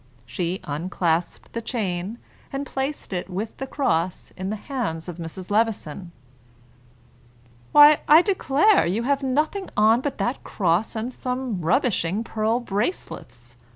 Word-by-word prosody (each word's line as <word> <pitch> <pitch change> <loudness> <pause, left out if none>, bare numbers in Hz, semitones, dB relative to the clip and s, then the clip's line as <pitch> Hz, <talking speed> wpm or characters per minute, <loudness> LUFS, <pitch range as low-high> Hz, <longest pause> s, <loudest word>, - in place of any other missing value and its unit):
She 170 +10 -3
unclasped 165 +2 -2
the 230 - -3
chain, 205 -3 -3 0.3
and 275 +1 -3
placed 270 -3 -4
it 180 0 -3
with 200 +4 -4
the 270 - -5
cross 180 - -1
in 190 +1 -4
the 215 - -2
hands 215 - -4
of 175 -2 -6
Mrs. 180 +3 -7
Levison. 200 -6 -1 1.6
"Why, 295 0 +8
I 315 +3 +8
declare 380 - +3
you 205 +7 0
have 280 +2 +1
nothing 305 +9 0
on 220 +3 +5
but 285 0 -3
that 245 +3 -2
cross 185 +3 0
and 230 +3 -3
some 250 -7 -3
rubbishing 195 - +1
pearl 225 +1 0
bracelets!" 200 - -4
220 Hz, 135 wpm, -24 LUFS, 180-265 Hz, 1.6 s, Why